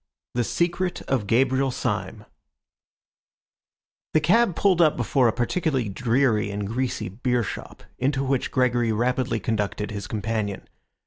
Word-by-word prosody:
THE 120 - +1
SECRET 175 +7 -1
OF 125 -7 -1
GABRIEL 130 +4 +2
SYME 105 -5 -3 1.9
The - - +7
cab 190 +4 +3
pulled 185 -2 +3
up 155 -3 +4
before 125 +1 +2
a - - +3
particularly 130 - -1
dreary 115 0 +1
and 100 0 -3
greasy 120 +5 -2
beershop, 120 +3 -3 0.2
into 135 +1 +1
which 135 -1 0
Gregory 120 -3 +2
rapidly 120 +1 0
conducted 105 -1 -2
his 100 -2 -5
companion. 105 -1 -3
125 Hz, 125 wpm, -24 LUFS, 110-135 Hz, 1.9 s, The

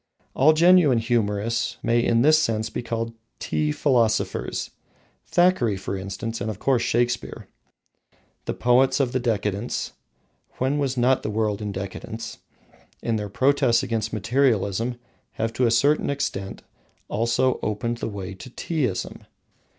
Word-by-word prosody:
All 150 +4 +5
genuine 170 -5 +5
humourists 115 -1 0
may 115 0 +2
in 115 0 +3
this 155 +2 +6
sense 110 -6 -1
be - - -3
called 115 -1 -3 0.2
tea 75 -1 -1
philosophers, 120 - 0 0.6
Thackeray, 175 - +3
for 95 +1 -4
instance, 100 +4 -5
and 105 - -2
of 105 - -4
course, 130 +1 +1
Shakespeare. 120 0 -1 1.0
The - - -3
poets 125 +3 +3
of 130 -3 +1
the 130 - 0
Decadence 105 -2 -2 0.7
(when 135 +3 0
was 135 -2 -1
not 125 +2 +3
the - - -3
world 105 -1 -1
in 105 -1 -3
decadence?), 110 +4 -6 0.6
in 115 -1 0
their 105 -1 -4
protests 130 +1 +2
against 110 -1 -2
materialism, 115 0 +1 0.4
have, 115 0 -2
to 125 +1 +2
a - - +3
certain 140 +6 +3
extent, 100 -9 -3 0.4
also 120 +4 +1
opened 115 +3 -2
the 115 - -4
way 100 -2 -6
to 95 +7 -11
Teaism. 130 - -3
115 Hz, 140 wpm, -24 LUFS, 105-130 Hz, 1.0 s, this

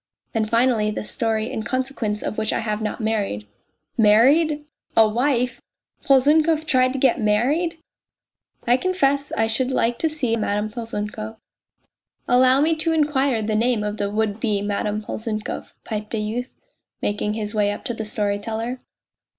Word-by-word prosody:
And, 220 -1 0
finally, 230 -2 +2
the 210 - -3
story, 225 +1 -1
in 220 - -3
consequence 255 -3 -2
of 215 - -3
which 215 -1 0
I - - -1
have 215 -1 -2
not 215 +2 -3
married." 205 - -1 0.3
" 155 - -50
Married! 295 +7 +4 0.3
A 225 -1 +7
wife! 250 +2 0 0.4
Polzunkov 305 +4 +4
tried 255 -3 +3
to - - -3
get 260 -2 +2
married!! 270 +12 +1 0.3
" - - -68
" - - -35
I 245 +1 +5
confess 285 -5 +1
I 225 - +2
should 250 +4 0
like 235 -2 +1
to 320 - +2
see 260 -7 -1
Madame 210 -1 -1
Polzunkov." 220 -1 -5 0.5
" - - -51
Allow 255 +2 +5
me 320 +2 +3
to 325 +1 +1
inquire 280 -6 +1
the 215 0 -1
name 230 0 +1
of 210 0 -3
the 200 -1 -1
would 215 0 -1
be 215 -3 0
Madame 210 +1 -2
Polzunkov," 215 0 -5
piped 215 +1 -4
a - - -1
youth, 225 +4 -3 0.5
making 210 +1 -1
his 210 -1 -3
way 210 -1 +2
up 205 - -6
to 240 - +3
the 225 - -4
storyteller. 220 +4 -2
225 Hz, 170 wpm, -22 LUFS, 215-260 Hz, 0.5 s, A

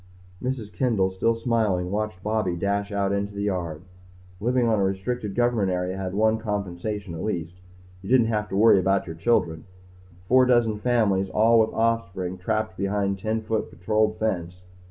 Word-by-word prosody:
Mrs. 125 -5 -4
Kendall, 110 -8 +1
still 115 +5 +1
smiling, 110 -6 0
watched 105 -3 -3
Bobby 105 -4 0
dash 100 +3 -1
out 100 -1 0
into 100 0 -2
the 100 - -3
yard. 90 -5 -3 0.6
Living 120 +3 +1
on 110 -2 +2
a - - +2
restricted 95 +2 -2
government 120 -5 +2
area 90 0 -2
had 95 -1 -4
one 110 +1 +2
compensation 105 -2 -4
at 80 - -6
least. 85 -5 -3 0.5
You 95 - -9
didn't 125 -2 +5
have 105 -1 -1
to - - -4
worry 105 -2 +6
about 95 +1 +1
your 80 -3 -7
children. 80 -3 0 0.6
Four 130 +2 +5
dozen 115 -4 +2
families, 105 -5 +1
all 115 +4 +4
with 110 0 +3
offspring, 95 -5 -1
trapped 110 0 -2
behind 100 0 -1
ten 110 +2 -2
foot 110 0 -2
patrolled 110 +3 0
fence. 90 -4 -3
105 Hz, 170 wpm, -25 LUFS, 95-110 Hz, 0.6 s, worry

